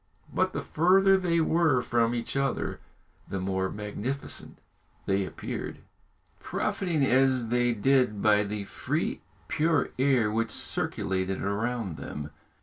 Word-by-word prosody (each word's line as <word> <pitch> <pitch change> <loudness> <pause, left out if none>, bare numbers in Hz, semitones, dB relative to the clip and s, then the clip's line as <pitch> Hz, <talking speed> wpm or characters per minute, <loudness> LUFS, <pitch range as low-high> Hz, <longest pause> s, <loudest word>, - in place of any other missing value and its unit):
But - - +1
the - - -3
further 195 +4 +4
they 175 -3 +1
were 160 -6 +3
from 120 0 +1
each 115 +2 -4
other 135 -2 -1 0.5
the 95 - -3
more 95 0 -1
magnificent 105 +6 -5 0.5
they 95 0 +1
appeared, - - -5 0.6
profiting, 165 -7 -1
as 130 -2 +3
they 120 0 +2
did, 125 -2 +2
by 105 0 +4
the 105 0 -4
free, - - -2 0.3
pure 160 0 +1
air 130 -5 +3
which 115 +1 0
circulated 95 -2 -1
around 105 -2 -2
them. 75 +2 -6
120 Hz, 125 wpm, -28 LUFS, 100-140 Hz, 0.6 s, further